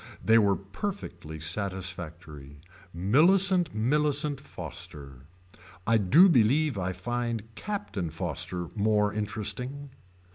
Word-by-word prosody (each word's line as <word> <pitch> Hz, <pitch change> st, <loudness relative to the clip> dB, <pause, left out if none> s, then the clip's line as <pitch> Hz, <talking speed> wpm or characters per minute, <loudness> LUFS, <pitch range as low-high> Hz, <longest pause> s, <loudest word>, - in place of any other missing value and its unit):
They 115 Hz, +1 st, +6 dB
were 100 Hz, -2 st, +3 dB
perfectly 100 Hz, -, -6 dB
satisfactory. 85 Hz, -5 st, -4 dB, 0.3 s
Millicent 170 Hz, -, +4 dB
Millicent 145 Hz, +4 st, +1 dB
Foster. 75 Hz, -, -9 dB, 0.6 s
I 115 Hz, +1 st, +4 dB
do 150 Hz, -, +6 dB
believe 145 Hz, -, +3 dB
I 95 Hz, -1 st, -2 dB
find 115 Hz, +3 st, -4 dB
Captain 155 Hz, -, -4 dB
Foster 90 Hz, +1 st, -4 dB
more 105 Hz, -1 st, +2 dB
interesting. 125 Hz, +7 st, -4 dB
105 Hz, 95 wpm, -28 LUFS, 90-140 Hz, 0.6 s, They